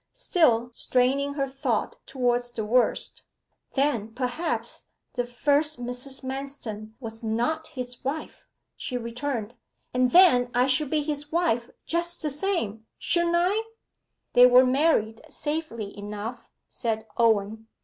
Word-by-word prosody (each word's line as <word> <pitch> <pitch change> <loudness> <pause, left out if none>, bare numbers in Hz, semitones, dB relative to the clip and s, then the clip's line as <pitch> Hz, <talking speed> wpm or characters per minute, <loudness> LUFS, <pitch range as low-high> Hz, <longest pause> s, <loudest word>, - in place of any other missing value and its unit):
Still 280 - +2
straining 270 +4 +1
her 275 -2 0
thought 265 -4 -1
towards 245 -2 0
the 225 -3 -4
worst, 245 +3 +1 0.5
'Then, 235 -6 0
perhaps, 265 +6 -3 0.3
the 245 -1 -2
first 290 +4 +1
Mrs. 250 +3 -4
Manston 260 -5 -6
was 225 -3 -7
not 240 +8 -1
his 250 -5 -6
wife,' 285 +4 -5 0.3
she 250 - -4
returned; 235 -1 -4 0.4
'and 250 0 +3
then 250 -8 +6
I 250 +1 +4
should 270 +2 +1
be 305 0 +1
his 295 0 -4
wife 315 -9 +1 0.2
just 340 +1 -1
the 300 - 0
same, 260 - -2
shouldn't 345 0 +2
I?' 375 +5 +2 0.7
'They 245 0 +9
were 250 +1 +7
married 255 -5 +2
safely 295 -9 -4
enough,' 210 +4 -6 0.2
said 220 -3 -3
Owen. 220 -1 +2
255 Hz, 130 wpm, -26 LUFS, 230-295 Hz, 0.7 s, They